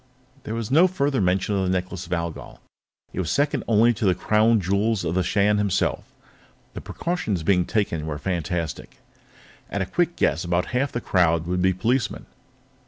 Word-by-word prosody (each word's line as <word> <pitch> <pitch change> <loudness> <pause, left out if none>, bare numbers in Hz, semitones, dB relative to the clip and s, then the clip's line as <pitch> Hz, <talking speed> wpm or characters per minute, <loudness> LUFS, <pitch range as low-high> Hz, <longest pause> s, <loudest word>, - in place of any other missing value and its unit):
_ - - -34
There 110 - -4
was 115 -2 -4 0.2
further 140 - 0
mention 95 +2 +1
of 95 - +1
the 95 - -1
Necklace 95 0 -3
of - - -15
Algol; 85 -1 -5 0.5
it - - -4
was 85 -4 -2
second 145 -2 0
only 115 +2 +4
to 110 - -6
the 95 -3 +3
Crown 110 +3 +3
Jewels 100 +2 0
of 80 - -1
the 95 - +1
Shan 105 +3 +2
himself. 100 -2 0 0.7
The - - -7
precautions 115 - -3
being 90 0 +2
taken 85 -8 -1
were 75 -2 -3
fantastic; 85 -1 -4 0.7
at 100 - -1
a - - -4
quick 175 - 0
guess, 80 +5 +1
about 85 0 -1
half 130 +2 0
the 120 - -3
crowd 85 -5 +2
would 90 +1 -1
be 95 +1 +3
policemen. 115 +4 -1
95 Hz, 180 wpm, -24 LUFS, 90-115 Hz, 0.7 s, only